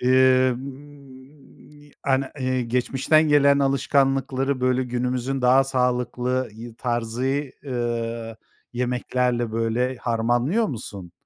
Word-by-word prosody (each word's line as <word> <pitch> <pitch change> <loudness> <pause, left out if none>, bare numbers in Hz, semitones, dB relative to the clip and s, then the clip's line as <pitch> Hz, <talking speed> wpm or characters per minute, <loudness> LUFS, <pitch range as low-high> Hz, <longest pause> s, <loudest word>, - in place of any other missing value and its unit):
emm, 130 +2 -1
ani 130 -2 -1
geçmişten 135 +5 +2
gelen 140 -1 +5
alışkanlıkları 135 -1 +1
böyle 130 0 +2
günümüzün 125 +2 -2
daha 130 +2 +5
sağlıklı 125 0 -1
y 115 +1 -10
tarzı, 120 0 -2 0.4
eee, 115 -3 -3 0.4
yemeklerle 125 -1 -1
böyle 115 +3 0
harmanlıyor 120 - 0
musun? 100 - -7
130 Hz, 85 wpm, -23 LUFS, 120-135 Hz, 0.4 s, gelen